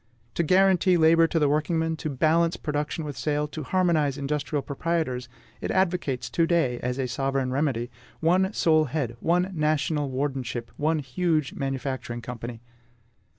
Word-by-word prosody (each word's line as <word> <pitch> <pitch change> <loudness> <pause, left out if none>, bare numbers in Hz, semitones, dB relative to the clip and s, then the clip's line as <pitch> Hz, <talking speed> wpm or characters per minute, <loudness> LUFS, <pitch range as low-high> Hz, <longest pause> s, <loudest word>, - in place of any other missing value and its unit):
To - - 0
guarantee 185 +1 +4
labor 165 0 +5
to 165 - -1
the 150 -2 +3
workingman, 160 +2 0
to 155 - -4
balance 165 +4 +2
production 150 +1 -3
with 145 -2 -5
sale, 150 0 -1
to 155 - -6
harmonize 155 -3 +1
industrial 145 0 -2
proprietors, 140 -5 -2 0.3
it - - -3
advocates 180 -8 0
to 165 -1 +2
day 155 -9 +1
as 125 +1 -2
a 130 -2 -1
sovereign 135 +1 -1
remedy 130 -4 -1 0.3
one 185 +4 +2
sole 155 -6 +3
head, 135 -4 -3
one 180 +6 +1
national 150 -2 0
wardenship, 130 -3 -3
one 155 +2 +1
huge 155 +1 0
manufacturing 130 -3 -4
company. 115 -1 -7
150 Hz, 150 wpm, -26 LUFS, 135-165 Hz, 0.3 s, labor